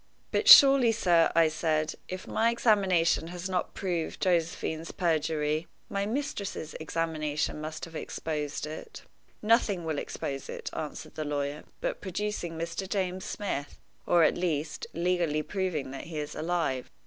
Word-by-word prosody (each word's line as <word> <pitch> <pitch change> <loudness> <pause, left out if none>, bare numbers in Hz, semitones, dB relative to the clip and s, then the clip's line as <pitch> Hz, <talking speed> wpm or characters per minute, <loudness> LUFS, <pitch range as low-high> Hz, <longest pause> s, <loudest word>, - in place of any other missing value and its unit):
"But - - 0
surely, 275 - +10
sir," 175 -7 +3
I 165 -1 +6
said, 155 -1 0
"if 185 0 -6
my 230 +1 +2
examination 195 -8 +3
has 175 +1 -5
not 185 -1 -2
proved 175 -4 -2
Josephine's 165 -2 0
perjury, 155 -2 0 0.2
my 200 0 -1
mistress's 215 - -3
examination 155 -2 -2
must 155 0 -5
have 165 -1 -13
exposed 150 -2 -3
it?" 160 - -8 0.4
"Nothing 210 -5 +3
will 155 -3 -1
expose 135 -1 -5
it," - - -6
answered 155 0 -6
the 155 - -3
lawyer, 145 0 -3 0.2
"but - - -2
producing 190 -3 -3
Mr. 170 +3 -4
James 185 -2 -1
Smith, 165 -9 -4 0.3
or, 175 -1 +5
at - - +3
least, 155 -4 -2
legally 170 -3 +1
proving 180 -9 -2
that 135 - -7
he 160 0 -7
is 150 -1 -4
alive. 155 -6 -1
165 Hz, 145 wpm, -29 LUFS, 155-190 Hz, 0.4 s, surely